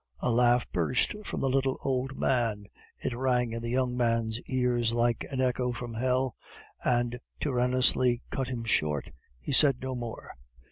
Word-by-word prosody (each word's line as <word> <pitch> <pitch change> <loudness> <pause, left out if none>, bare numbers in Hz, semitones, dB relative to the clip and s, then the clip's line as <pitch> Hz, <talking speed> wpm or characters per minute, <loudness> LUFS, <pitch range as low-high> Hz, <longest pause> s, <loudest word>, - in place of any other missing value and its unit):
A - - 0
laugh 120 +1 +3
burst 125 - +1
from - - -3
the 135 - +1
little 135 0 +1
old 130 0 -1
man. 115 -6 0 0.3
It 120 - -3
rang 125 -2 +1
in 115 0 -4
the 115 - -4
young 125 0 0
man's 115 -2 +1
ears 125 -3 +1
like 120 -1 +1
an 135 - -4
echo 125 -1 +1
from 120 -1 -6
hell; 130 +1 0 0.5
and 120 0 +1 0.2
tyrannously 125 -2 +2
cut 135 -1 -2
him 125 -3 -4
short. 75 -10 0 0.3
He - - -5
said 135 -2 +5
no 130 0 -4
more. 120 -2 -6
125 Hz, 160 wpm, -29 LUFS, 120-130 Hz, 0.5 s, said